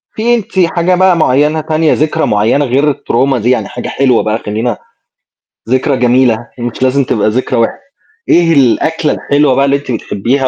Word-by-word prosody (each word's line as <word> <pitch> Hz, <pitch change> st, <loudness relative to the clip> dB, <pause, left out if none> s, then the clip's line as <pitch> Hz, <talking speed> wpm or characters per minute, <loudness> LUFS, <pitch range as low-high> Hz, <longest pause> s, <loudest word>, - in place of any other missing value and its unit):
في 235 Hz, +2 st, +1 dB
أنتِ 195 Hz, -4 st, -4 dB
حاجة 175 Hz, +1 st, +1 dB
بقى 185 Hz, -1 st, +3 dB
معيّنة 150 Hz, +2 st, +1 dB
تانية 155 Hz, 0 st, 0 dB
ذكرى 155 Hz, +1 st, 0 dB
معيّنة 110 Hz, +8 st, +1 dB
غير 140 Hz, +4 st, +1 dB
الTrauma 135 Hz, +2 st, -1 dB
دي، 120 Hz, +2 st, -1 dB
يعني 130 Hz, -, 0 dB
حاجة -, -, -7 dB
حلوة 130 Hz, -4 st, +1 dB
بقى 110 Hz, +1 st, -1 dB
خلّينا، 110 Hz, +3 st, -3 dB, 0.9 s
ذكرى 130 Hz, +1 st, +1 dB
جميلة 125 Hz, -1 st, +2 dB, 0.2 s
هي 120 Hz, -, -7 dB
مش 120 Hz, +2 st, -4 dB
لازم 135 Hz, +2 st, +2 dB
تبقى 110 Hz, -3 st, 0 dB
ذكرى 120 Hz, 0 st, -1 dB
وحشة، 115 Hz, -, -1 dB, 0.5 s
إيه 170 Hz, -1 st, +3 dB
الأكلة 150 Hz, +4 st, +1 dB
الحلوة 145 Hz, -2 st, +1 dB
بقى 140 Hz, -, +2 dB
اللي 140 Hz, -, +1 dB
أنتِ 140 Hz, -2 st, -7 dB
بتحبيها 120 Hz, +4 st, -1 dB
135 Hz, 180 wpm, -12 LUFS, 120-155 Hz, 0.9 s, بقى